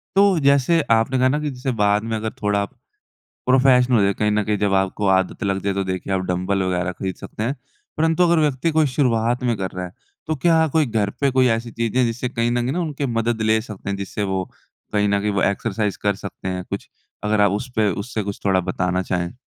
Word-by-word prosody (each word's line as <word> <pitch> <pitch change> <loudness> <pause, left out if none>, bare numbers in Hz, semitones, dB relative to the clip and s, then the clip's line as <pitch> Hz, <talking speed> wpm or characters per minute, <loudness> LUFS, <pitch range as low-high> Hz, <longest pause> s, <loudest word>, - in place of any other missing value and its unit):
तो 195 -3 +5
जैसे 140 +3 +3 0.2
आपने 115 +4 0
कहा 130 - +4
ना 145 +3 0
कि 150 -1 -2
जैसे 130 0 -3
बाद 105 +1 +3
में - - 0
अगर 110 +1 -3
थोड़ा 100 -1 +1 0.6
प्रोफ़ेशनल 130 -1 +3
हो 105 - +4
जाए, 100 0 +3
कहीं 105 +2 0
न 105 0 +2
कहीं 105 0 0
जब 100 -1 +1
आपको 95 +1 0
आदत 95 +4 -1
लग 95 -1 0
जाए, 100 - 0
तो 100 - -1
देखिए 95 +1 -3
आप 95 - +1
डम्बल 95 +2 0
वग़ैरह 90 -1 -1
खरीद 95 +1 -4
सकते - - -7
हैं। 125 +5 0 0.4
परंतु 160 +2 +2
अगर 170 -1 +3
व्यक्ति 150 +1 +1
कोई 155 -2 +5
शुरुआत 120 -2 +1
में 120 -3 +1
कर 95 -1 -3
रहा 90 0 -5
है, 90 - -8 0.3
तो 160 - 0
क्या 160 +3 +3
कोई 155 -3 +3
घर 110 -3 0
पे 140 -1 +3
कोई 130 0 +3
ऐसी 115 +1 -6
चीजें 115 +1 -1
है, - - +4
जिससे 120 +2 -2
कहीं 120 -1 -1
ना 120 0 0
कहीं 130 +6 -2
उनके 145 -3 -3
मदद 115 -1 -1
ले 110 0 +3
सकते 105 -2 -9
हैं, 100 - -1
जिससे 100 +1 -4
वो 95 -1 -1 0.5
कहीं 105 -1 +2
ना 100 0 +2
कहीं 105 +1 0
वो 95 -2 +1
एक्सरसाइज़ 105 0 -1
कर 100 0 +2
सकते 95 - -6
हैं? 90 -1 -3
कुछ - - -5 0.4
अगर 105 0 +2
आप 100 -1 +5
उसपे 110 0 0
उससे 110 -1 -4
कुछ 100 0 -5
थोड़ा 95 -2 +3
बताना 90 0 0
चाहें? 90 -1 -2
110 Hz, 235 wpm, -21 LUFS, 100-130 Hz, 0.6 s, तो